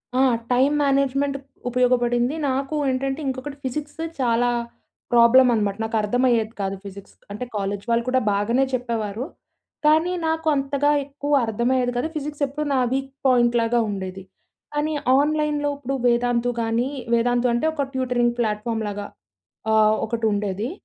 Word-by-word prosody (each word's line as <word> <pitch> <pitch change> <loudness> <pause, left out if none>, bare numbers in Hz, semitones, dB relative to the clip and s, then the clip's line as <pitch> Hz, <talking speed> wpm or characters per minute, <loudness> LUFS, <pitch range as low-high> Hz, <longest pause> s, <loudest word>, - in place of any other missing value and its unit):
ఆ! - - +2 0.3
Time 265 +4 +3
management 275 0 +1 0.3
ఉపయోగపడింది. 245 +1 +2
నాకు 270 +3 -2
ఏంటంటే 270 +2 -1
ఇంకొకటి 270 +2 -4
ఫిజిక్స్ 290 +4 -5 0.2
చాలా 245 -1 +2 0.6
ప్రాబ్లమ్ 240 +2 +7
అనమాట 205 -3 0
నాకు 225 0 -3
అర్థమయ్యేది 230 0 +1
కాదు 195 0 -2
ఫిజిక్స్. 200 0 -10 0.2
అంటే 210 +5 -5
కాలేజ్ 200 0 -2
వాళ్ళు 235 0 +2
కూడా 260 0 +2
బాగనే 230 +7 +2
చెప్పేవారు 230 -2 -2 0.6
కానీ 315 +4 +4
నాకు 320 0 -1
అంతగా 280 +1 +1
ఎక్కువ 285 +1 -4
అర్థమయ్యేది 245 +3 0
కాదు. 245 - 0
ఫిజిక్స్ 295 0 -5
ఎప్పుడు 300 +3 -4
నా 265 - +2
వీక్ 270 0 -2 0.2
పాయింట్‌ 240 -2 +3
లాగా 235 +1 +1
ఉండేది. 190 -1 -5 0.5
కానీ 295 +1 -1 0.2
ఆన్‍లైన్‍లో 295 0 +1
ఇప్పుడు 275 -1 -3
వేదాంతు 240 0 +2
గానీ, 230 +2 0 0.3
వేదాంతు 245 +1 +2
అంటే 240 +5 0
ఒక 285 -3 -1
ట్యూటరింగ్ 250 -2 +1
ప్లాట్‍ఫామ్‌ 220 0 -1
లాగా 205 0 -5 0.7
ఆహ్, 215 0 +5
ఒకటుండేది. 210 -1 -1
245 Hz, 135 wpm, -23 LUFS, 225-275 Hz, 0.7 s, ప్రాబ్లమ్